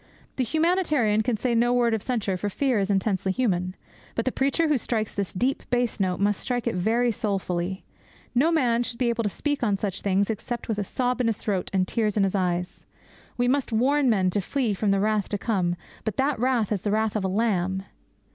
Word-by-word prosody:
The 260 - +2
humanitarian 305 - +2
can 220 0 0
say 240 +3 0
no 240 +1 +3
word 240 -2 +3
of 220 - 0
censure, 215 -6 -1
for 205 +3 -2
fear 255 +2 +1
is 195 0 -1
intensely 195 -1 +1
human. 185 -5 0 0.4
But 230 - -1
the 260 - +1
preacher 280 +6 +1
who 295 -4 +2
strikes 220 -2 -2
this 200 -2 -2
deep 250 +8 0
bass 245 -2 0
note 185 -2 0
must 205 0 +1
strike 245 -2 -2
it 235 - 0
very 230 +6 +2
soulfully. 190 -3 -2 0.5
No 280 +7 +3
man 245 -7 +2
should 240 -1 -3
be 245 -1 +1
able 235 0 0
to 210 - 0
speak 290 +7 -2
on 210 -4 +1
such 195 -2 -3
things 200 +2 +1
except 235 +3 -5
with 220 -2 -1
a - - 0
sob 250 +5 -1
in 240 - +1
his 225 -2 0
throat 195 -4 -2
and 185 -1 +1
tears 215 -1 0
in 200 - +4
his 195 - +1
eyes. 180 -2 -1 0.5
We 245 0 +2
must 270 0 +1
warn 265 +4 +3
men 190 -5 +2
to 205 - 0
flee 240 +2 -1
from 200 +1 0
the 195 0 +3
wrath 210 0 +1
to 205 - -1
come; 185 -5 0 0.3
but 220 -3 -3
that 270 -2 +1
wrath 245 -4 +1
is 205 -4 0
the 210 - -1
wrath 215 +1 +1
of 210 - 0
a - - +1
Lamb. 190 -2 0
220 Hz, 225 wpm, -25 LUFS, 195-245 Hz, 0.5 s, in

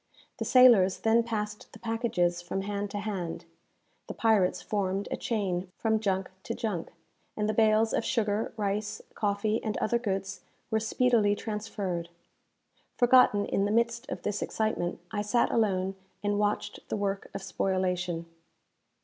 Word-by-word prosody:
The - - -2
sailors 235 -8 +6
then 225 +1 +4
passed 215 -2 -4
the - - -10
packages 225 -7 0
from 175 +2 -3
hand 205 0 -3
to 205 - -5
hand; 195 -5 -4 0.6
the - - -6
pirates 215 -5 +3
formed 200 -1 -1
a - - +1
chain 190 -5 -2
from 220 -1 +1
junk 190 -3 -1
to - - -4
junk; 200 -7 -3 0.5
and 210 0 0
the 215 - +1
bales 220 0 +3
of - - +1
sugar, 215 -2 0
rice, 210 +1 -2
coffee, 210 +1 0
and 215 -2 -2
other 235 +2 +1
goods 195 -3 -3 0.3
were 220 - +3
speedily 220 -2 +2
transferred. 200 -5 -4 0.9
Forgotten 245 -4 +5
in 195 - 0
the 205 - 0
midst 235 +2 +1
of - - -5
this 210 0 -2
excitement, 215 -5 -1
I 210 -1 -1
sat 220 +3 +2
alone 195 -4 +1 0.3
and 205 0 +1
watched 210 0 -1
the - - -1
work 200 -1 -2
of 195 - -4
spoilation. 180 -3 -1
205 Hz, 150 wpm, -29 LUFS, 195-220 Hz, 0.9 s, sailors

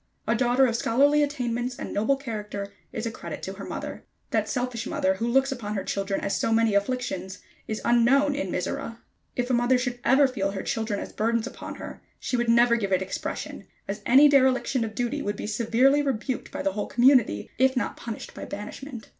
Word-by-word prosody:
A 225 - +3
daughter 245 +2 +3
of 235 -3 0
scholarly 285 +6 +3
attainments 250 -4 -1
and - - -6
noble 220 +7 +2
character 210 -6 -6 0.2
is 220 - -4
a 230 - -2
credit - - -8
to - - -4
her - - -9
mother. - - -6 0.3
That - - 0
selfish 250 -2 -2
mother 285 0 +1
who 230 - -1
looks 270 +3 +3
upon 215 -5 -4
her 195 - -2
children 195 0 -2
as 200 - -1
so - - 0
many 225 -1 +3
afflictions 200 -4 -1 0.3
is 220 - -4
unknown 270 +5 +4
to 285 - -2
Mizora. 230 +6 -3 0.4
If 245 +1 -1
a - - +2
mother 240 +1 +3
should 245 -1 -3
ever 275 +1 +5
feel 195 -6 -2
her 190 - -4
children 220 -2 -2
as - - -7
burdens 230 +1 0
upon 260 - -7
her, - - -9 0.2
she - - -2
would 240 -1 0
never 235 0 +5
give 200 -4 -2
it 185 0 +2
expression, 190 - -5 0.2
as 205 +1 -4
any 275 +4 +8
dereliction 260 -2 +3
of 220 -1 -5
duty 245 +4 -1
would 205 -4 -2
be - - -6
severely 235 +6 +3
rebuked 260 -2 -2
by - - -4
the 195 - +1
whole 205 +2 -3
community, 245 - +3
if 260 0 +3
not - - -1
punished 230 -2 -7
by - - -8
banishment. 230 +4 -8
240 Hz, 205 wpm, -26 LUFS, 215-260 Hz, 0.4 s, any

